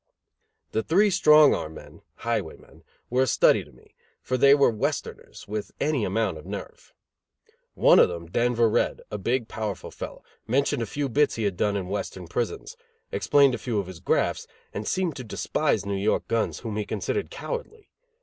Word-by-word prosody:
The 110 - 0
three 200 - +3
strong 150 -4 +6
arm 80 +1 -4
men - - -13 0.2
(highwaymen) - - -4 0.3
were 125 +1 +2
a 130 - +3
study - - +4
to - - -18
me, 65 - -22 0.3
for 130 - -2
they 140 +2 +6
were 140 -4 +4
Westerners, 110 - -4
with 105 0 -5
any 145 -7 +1
amount 95 -4 -1
of 75 - -13
nerve. - - -8 0.8
One - - +6
of - - +6
them, 85 -1 -6
Denver 120 +6 +2
Red, 110 - 0
a 105 - -4
big 120 +4 -1
powerful 110 -3 -5
fellow, - - -8 0.2
mentioned 135 0 +1
a 115 - -2
few 145 +6 -2
bits 140 +3 +2
he 115 - -3
had 100 -3 0
done 100 +3 0
in 95 -2 -4
Western 95 -2 -4
prisons, 120 - -3 0.4
explained 140 -2 +4
a 120 - -3
few 120 -4 -2
of 100 - -2
his 90 -2 -10
grafts 90 - 0 0.3
and 105 +1 -5
seemed 185 -5 0
to 130 - -6
despise 110 -1 -1
New 100 - -2
York 100 +3 0
guns, 115 -1 -1
whom 110 -3 -4
he 105 - 0
considered - - -2
cowardly. 455 -3 -7
115 Hz, 185 wpm, -25 LUFS, 100-140 Hz, 0.8 s, strong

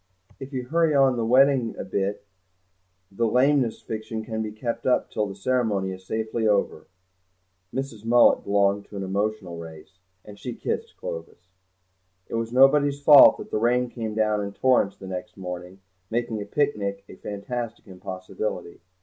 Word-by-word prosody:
If 135 0 -8
you 130 -2 -3
hurry 160 +2 +2
on 135 -2 +4
the 115 - -1
wedding 130 -1 +4
a - - -4
bit 100 +1 -2 0.9
the 115 +4 0
lameness 125 0 +2
fiction 110 0 -5
can 110 -1 -3
be 110 -1 -4
kept 115 +4 -4
up 125 - +1
till 105 -1 -1
the 95 - -8
ceremony 105 -3 0
is 95 0 -10
safely 110 0 -1
over." 105 -1 0 0.8
Mrs. 130 -5 -5
Mullet 120 +1 +5
belonged 100 0 +1
to 100 - -10
an 95 - -3
emotional 100 -2 -2
race, 85 +3 -12 0.3
and 105 -1 -12
she 125 -2 -6
kissed - - -4
Clovis. 85 +2 -8 0.8
It - - -11
was 115 0 -2
nobody's 140 +2 +4
fault 145 -1 +8
that - - -10
the - - 0
rain 125 +2 +2
came 110 -3 -5
down 110 -1 +1
in 100 0 -5
torrents 125 -6 +2
the - - -11
next 95 +3 -7
morning, 90 0 -7 0.3
making 115 -2 -2
a - - -5
picnic 100 -6 -1
a - - -12
fantastic 115 +3 -6
impossibility. 95 -1 -6
110 Hz, 165 wpm, -25 LUFS, 100-125 Hz, 0.9 s, fault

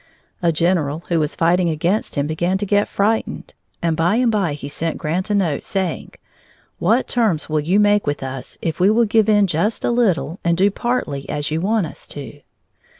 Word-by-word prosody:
A 170 -1 +3
general 165 -2 0
who 170 -2 +2
was 150 0 -1
fighting 175 +1 +2
against 170 +7 -1
him 140 - 0
began 175 +5 0
to 205 - -3
get 205 +1 +2
frightened, 215 +3 -1 0.3
and 165 -1 +1
by 170 +5 +2
and 240 -1 +2
by 195 -8 0
he 140 -1 -7
sent 160 +3 -3
Grant 175 +6 -2
a 210 - +1
note 170 -8 0
saying: 190 -4 -3 0.7
"What 225 +9 +2
terms 215 -12 0
will 155 0 +1
you 175 +7 +2
make 205 -2 +3
with 145 -1 -2
us 130 -1 -7
if 165 - -2
we 185 +2 +5
will 230 +2 +4
give 220 0 +2
in 205 -1 +5
just 195 +5 -1
a - - +2
little 195 -8 +1
and 170 -1 +1
do 195 +2 +3
partly 190 - -2
as 145 +1 -3
you 160 +1 -1
want 210 0 +1
us 155 - -8
to?" 145 0 -9
175 Hz, 205 wpm, -20 LUFS, 155-205 Hz, 0.7 s, we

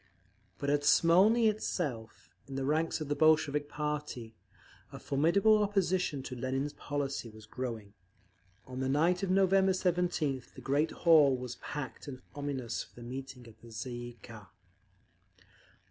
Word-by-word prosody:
But 140 - -1
at 145 0 +1
Smolny 195 +10 +5
itself, 140 - -3
in 135 - -7
the 135 0 -2
ranks 160 +3 0
of 155 - -3
the 145 - 0
Bolshevik 150 -1 +3
party, 150 -6 -4 0.6
a - - -8
formidable 170 +10 +3
opposition 185 -8 0
to 130 - -6
Lenin's 135 +3 -2
policy 140 -4 -4
was 110 0 -14
growing. 110 -3 -6 0.7
On 130 0 -7
the 130 0 -1
night 165 +6 +2
of 195 - -1
November 190 0 +4
17th 175 -7 -1
the - - -9
great 145 +4 +1
hall 150 -6 +5
was 125 -1 -6
packed 145 -2 -7
and 130 -2 -8
ominous 140 -5 -3
for - - -13
the 120 - -10
meeting 130 -1 -8
of 110 -1 -17
the 120 - -14
_Tsay 110 +2 -6
ee 120 0 -7
kah. 110 -4 -12
145 Hz, 150 wpm, -31 LUFS, 125-165 Hz, 0.7 s, Smolny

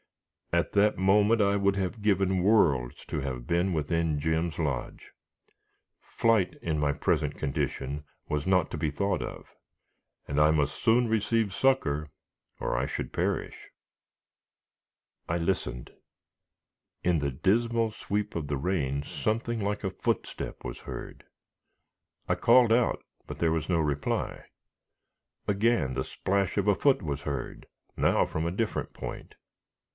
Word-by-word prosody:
At 85 -2 +1
that 105 +1 +3
moment, 105 +4 +4
I 100 0 +3
would 100 -1 +2
have 95 +3 -2
given 95 -2 +2
worlds 75 - +2
to - - -3
have 65 -3 -5
been 85 +3 +1
within 80 -1 0
Jim's 80 +1 0
lodge. 70 -6 -3 0.9
Flight, 110 -6 +1
in 80 -2 -1
my 75 -1 +2
present - - 0
condition, 70 +1 -2 0.2
was 75 -1 -1
not 90 -3 +3
to - - -3
be 80 0 0
thought 100 +7 0
of, - - -6 0.8
and 70 +1 +1
I 75 +1 +6
must 75 -2 +1
soon 120 +1 +4
receive 110 -1 +1
succor 80 - +1 0.5
or - - -1
I - - +1
should - - -4
perish. - - -2 1.6
I 85 - +1
listened. 85 -8 -2 1.1
In 85 -2 +2
the 70 -1 -1
dismal 115 - +1
sweep 105 0 -3
of 80 -3 -3
the 70 -1 -1
rain 70 -4 -1
something 115 +7 -2
like 100 +1 -2
a 95 - -1
footstep - - -3
was - - -5
heard. - - -8 1.0
I - - +2
called 120 -1 +5
out, 120 0 +2 0.2
but - - -6
there 80 -1 +2
was 80 +1 -2
no 85 -2 +2
reply. 75 -2 -1 1.0
Again 105 - +2
the 65 0 -1
splash 100 0 -1
of 100 0 +1
a 100 - +5
foot 135 -4 +3
was 70 -3 -3
heard, 70 -3 -5 0.3
now - - +3
from 80 +1 -3
a 85 - 0
different 105 +4 -2
point. - - -7
90 Hz, 140 wpm, -28 LUFS, 75-105 Hz, 1.6 s, I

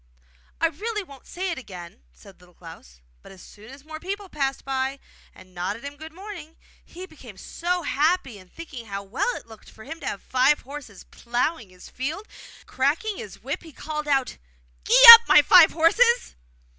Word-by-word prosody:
'I 330 +2 +2
really 420 +6 -5
won't 275 -7 -17
say 370 +1 -5
it 330 - -5
again!' 180 - -12
said 190 - -19
Little 180 -1 -22
Klaus. 65 - -15 0.2
But - - -16
as 190 -1 -15
soon 215 +1 -16
as 270 +2 -15
more 315 0 -9
people 390 +3 -7
passed 275 -4 -4
by, 270 0 -3 0.4
and 185 0 -18
nodded 185 +6 -5
him 285 0 -8
good 315 +2 -12
morning, 350 -3 -11 0.3
he 365 +2 -11
became 260 - -15
so 350 - -4
happy 290 - -1
in 185 -1 -19
thinking 270 - -11
how 200 -1 -6
well 230 - -3
it - - -10
looked 220 -2 -17
to - - -16 0.2
have 200 - -5
five 260 +3 +1
horses 270 -9 -11
ploughing 240 - -3
his 185 0 -16
field 310 +11 -6
that, - - -18
cracking 320 +11 -2
his 205 - -11
whip, 275 +4 -5
he 325 - -14
called 300 +1 -7
out 270 -3 -1 0.5
'Gee - - +4
up, 460 - +9
my - - +6
five 345 -3 +7
horses! 470 +10 +1
280 Hz, 180 wpm, -23 LUFS, 220-335 Hz, 0.5 s, up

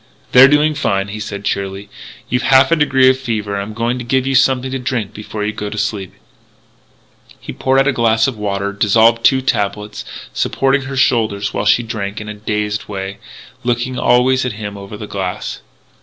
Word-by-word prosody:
"They're 125 +1 +9
doing 150 +2 +3
fine," 100 -9 -1
he 105 +2 -6
said 100 -1 -6
cheerily. 100 0 -3 0.4
"You've 125 0 0
half 135 +1 +4
a - - +6
degree 135 -4 +3
of 130 - -4
fever 110 -5 -3
and 100 - -2
I'm 105 +2 -7
going 120 +2 -1
to - - -5
give 130 +2 0
you 135 - 0
something 130 0 +2
to 135 - -2
drink 120 -5 -3
before 105 0 -5
you 105 - -2
go 105 -1 -5
to 105 - -7
sleep 105 -3 -3 0.6
" - - -29
He - - -8
poured 130 0 +1
out 135 - +1
a - - +4
glass 115 -3 +2
of 135 - -1
water, 100 -1 -2
dissolved 115 +3 +3
two 130 -1 +4
tablets, 105 -3 -2 0.3
supported 135 0 0
her 135 0 -5
shoulders 110 -6 +1
while 105 - -1
she 115 +3 +4
drank 105 -3 -4
in 105 - -8
a - - -4
dazed 105 0 -3
way, 95 -1 -5 0.4
looking 120 +1 -1
always 130 +1 +3
at 125 - -2
him 105 -1 -6
over 100 +1 -9
the 105 - -7
glass. 95 -3 -4
110 Hz, 200 wpm, -17 LUFS, 105-130 Hz, 0.6 s, They're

